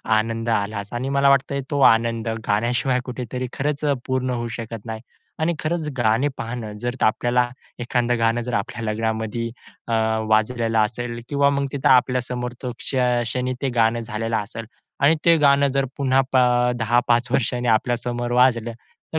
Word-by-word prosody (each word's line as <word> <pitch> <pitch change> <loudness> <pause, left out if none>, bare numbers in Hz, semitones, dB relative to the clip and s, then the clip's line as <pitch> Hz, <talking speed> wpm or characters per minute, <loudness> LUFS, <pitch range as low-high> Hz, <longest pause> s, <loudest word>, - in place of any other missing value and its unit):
आनंद 115 +1 -1
आलाच 100 -1 -2
आणि 125 +3 -2
मला 140 0 +4
वाटतंय, 140 0 +2
तो 145 -2 0
आनंद 115 0 +1 0.2
गाण्याशिवाय 120 +4 +1
कुठेतरी 125 0 -5
खरंच 145 +2 -2
अ, 145 - +3
पूर्ण 130 0 -1
होऊ 120 -1 -2
शकत 115 -2 -7
नाही. 110 -1 -5 0.4
आणि 160 +2 +1
खरंच, 155 0 -2
गाणे 120 +4 +2
पाहणं, 115 -2 -5
जर 120 0 -1
आपल्याला 120 +2 +2 0.3
एखादं 120 0 0
गाणं 115 +1 +2
जर 125 - -2
आपल्या 115 +3 -3
लग्नामध्ये 110 +1 -2 0.4
अ, - - -2 0.4
वाजलेलं 115 +1 +1
असेल 120 +2 -4
किंवा 140 -1 +3
मग 140 - 0
तिथं 140 -2 0
आपल्या 125 0 +4
समोर 125 0 -4
तो 125 - -3
क्ष - - -6 0.3
क्षणी 125 +2 -2
ते 135 - +1
गाणं 115 +1 +3
झालेलं 115 0 -3
असेल. 110 +2 -5 0.3
आणि 140 +4 +5
ते 170 -1 +6
गाणं 140 -2 +4
जर 135 - +2
पुन्हा 135 -1 +2
पा 130 -1 +5 0.3
अ, - - +1
10-5 120 +1 +2
वर्षांनी 120 0 0
आपल्यासमोर 120 +1 0
वाजलं, 120 -2 +3 0.4
तर 160 - +2
120 Hz, 165 wpm, -22 LUFS, 115-130 Hz, 0.4 s, ते